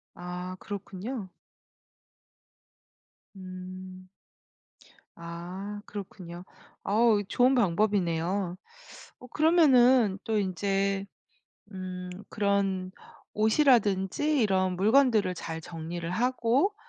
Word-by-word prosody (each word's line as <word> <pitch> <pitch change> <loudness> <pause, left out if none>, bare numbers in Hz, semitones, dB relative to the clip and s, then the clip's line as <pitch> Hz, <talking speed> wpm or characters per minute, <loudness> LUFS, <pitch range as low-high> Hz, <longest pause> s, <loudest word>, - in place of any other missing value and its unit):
아 180 +1 -6
그렇군요. 200 +2 -6 2.1
음. 185 0 -9 1.1
아 180 +5 -7
그렇군요. 180 -3 -8 0.4
어우 215 0 +3
좋은 250 +5 +3
방법이네요. 185 -3 +1 0.6
어 250 - -12
그러면은 260 - +4
또 220 -1 0
인제 195 +1 0 0.7
음 185 -1 -6 0.2
그런 200 -2 0 0.4
옷이라든지 220 +3 +3
이런 185 -3 +1
물건들을 215 -2 +3
잘 165 -1 -6
정리를 165 0 -6
하고 250 - +1
195 Hz, 170 characters per minute, -28 LUFS, 185-225 Hz, 2.1 s, 그러면은